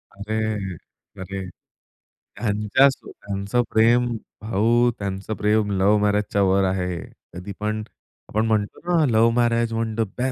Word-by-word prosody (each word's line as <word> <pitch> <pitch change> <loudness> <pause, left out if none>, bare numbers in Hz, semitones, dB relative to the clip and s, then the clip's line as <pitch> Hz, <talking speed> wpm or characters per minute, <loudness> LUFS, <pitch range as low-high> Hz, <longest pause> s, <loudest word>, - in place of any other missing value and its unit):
अरे! 105 -2 -3 0.5
अरे! 95 +1 -5 0.9
त्यांच्या 105 +5 +3 0.2
त्यांचं 100 +4 -2
प्रेम, 115 +2 +4 0.4
भाऊ 115 +3 +2
त्यांचं 100 +1 -4
प्रेम 105 0 +1
लव्ह 100 +3 +4
मॅरेजच्या 105 0 +1
वर 95 +1 +3
आहे. 90 -2 -1 0.4
कधी 90 +3 -7
पण 105 +1 -2 0.5
आपण 110 +2 0
म्हणतो 105 -2 -1
ना, 175 -3 +3
लव्ह 115 +1 +5
मॅरेज 115 -1 +2
म्हणजे 115 +3 -2
105 Hz, 115 wpm, -23 LUFS, 100-115 Hz, 0.9 s, लव्ह